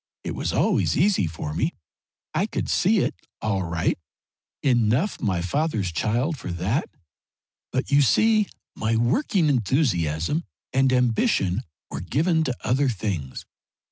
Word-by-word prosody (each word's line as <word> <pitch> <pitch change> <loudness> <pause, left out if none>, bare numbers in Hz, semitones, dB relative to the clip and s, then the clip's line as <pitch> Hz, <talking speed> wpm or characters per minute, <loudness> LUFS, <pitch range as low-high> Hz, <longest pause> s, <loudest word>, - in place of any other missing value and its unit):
It - - -3
was - - -2
always - - +2
easy 185 - +3
for 80 -1 -5
me. 150 - -1 0.6
I - - +1
could - - -3
see - - +3
it, - - 0 0.3
all 100 -3 0
right 85 -1 -1 0.6
enough 125 - +2
my 95 -5 0
father's 110 - 0
child 120 - 0
for 90 - -5
that, 100 - -1 0.8
but 130 +2 -2
you 145 0 +6
see 215 - +4 0.3
my 110 +1 0
working 170 - +2
enthusiasm 115 - +1 0.3
and 135 0 +3
ambition 120 - +2 0.3
were 70 - -4
given 160 - +1
to 130 - -1
other 130 +2 +2
things. 95 - -4
120 Hz, 135 wpm, -24 LUFS, 90-150 Hz, 0.8 s, you